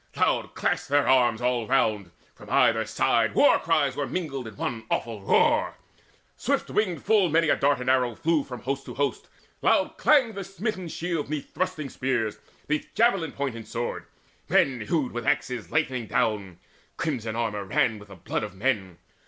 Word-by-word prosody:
Loud - - 0
clashed - - -1
their 145 0 +3
arms 120 -3 +3
all 125 -3 0
round; 105 -7 +1 0.2
from - - -14
either 110 0 +3
side 115 -1 +1
War 145 - +5
cries 155 -4 +1
were 145 -2 -2
mingled 140 -9 -4
in 110 - -10
one 115 -2 -3
awful 115 -3 -2
roar 95 - +2 0.6
Swift - - -1
winged 185 -8 0
full 205 -4 +4
many 165 +1 +3
a - - +5
dart 140 -2 +2
and 125 - -6
arrow 125 -3 +2
flew 160 +1 +1
From 125 -2 -8
host 135 +1 -3
to - - -7
host; 140 0 -2 0.3
loud - - +2
clanged 260 -7 +4
the 200 -1 -5
smitten 195 0 -4
shields 165 -3 -3
'Neath 150 -2 -5
thrusting 185 -6 -2
spears, 120 -5 -1 0.3
'neath 150 0 -1
javelin 195 -8 +2
point 140 -4 -3
and 115 -1 -9
sword: 120 +1 -4 0.4
Men 130 -4 +3
hewed 150 -6 0
with 120 0 -4
battle 145 +1 +4
axes 125 -5 -7
lightening 130 -7 0
down; 100 -3 -1 0.4
Crimson 120 -8 -2
the 115 - -3
armour 105 -3 -2
ran 105 +3 +1
with 105 0 -14
blood - - -2
of 105 -2 -6
men. 100 -6 -1
130 Hz, 180 wpm, -26 LUFS, 115-160 Hz, 0.6 s, War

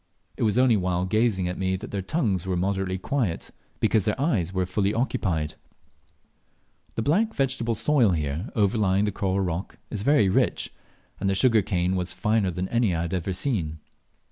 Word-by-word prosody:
It - - -9
was 105 -1 +2
only 125 -2 +5
while 90 -2 0
gazing 105 -2 +1
at 90 - -4
me 95 0 0
that 100 +6 -7
their 100 - -2
tongues 95 - -1
were 90 -1 0
moderately 95 0 -1
quiet, 105 -3 -2 0.3
because 110 -4 +2
their 105 - 0
eyes 110 - +1
were 95 -1 0
fully 100 +3 0
occupied. 95 - -1 1.4
The 115 - -1
black 210 - +1
vegetable 130 -4 0
soil 125 -5 +3
here 75 - -2
overlying 100 -2 +2
the 105 - 0
coral 100 0 -1
rock 90 0 -3
is 105 - -2
very 115 -3 +4
rich, 95 - 0 0.5
and 95 - 0
the 95 - +1
sugar 115 +2 +4
cane 90 -1 0
was 90 -1 -2
finer 105 -3 +1
than 90 +1 -3
any 115 -6 +2
I 80 - -1
had 85 - -4
ever 90 +1 -1
seen. 90 - -2
95 Hz, 180 wpm, -25 LUFS, 90-115 Hz, 1.4 s, only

